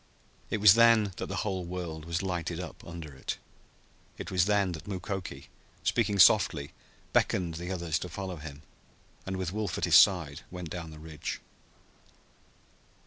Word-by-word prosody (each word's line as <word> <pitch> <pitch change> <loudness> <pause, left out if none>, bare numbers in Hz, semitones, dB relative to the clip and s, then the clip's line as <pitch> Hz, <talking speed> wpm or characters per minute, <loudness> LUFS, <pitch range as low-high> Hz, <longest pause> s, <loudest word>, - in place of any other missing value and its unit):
It - - 0
was 100 -2 +9
then 115 -3 +5
that - - -4
the 100 - -4
whole 95 -3 -2
world 85 -3 -5
was 85 +3 -2
lighted 85 -2 -2
up 90 -4 -8
under 85 -3 -8
it. 65 - -5 0.8
It - - -6
was 90 -2 +3
then 100 -2 +2
that 80 +1 -8
Mukoki, 95 -7 -5 0.3
speaking 105 - +1
softly, 70 -5 +5 0.4
beckoned 85 -3 +2
the 85 +2 -6
others 85 -3 -1
to 90 - -6
follow 95 0 -5
him, 75 -1 -9 0.6
and 95 0 -2
with 95 -1 -3
Wolf 105 -5 -2
at - - 0
his - - +4
side 80 -6 +5
went 90 -3 -7
down 85 -2 -5
the 80 - -11
ridge. 80 0 -6
90 Hz, 160 wpm, -29 LUFS, 80-95 Hz, 0.8 s, was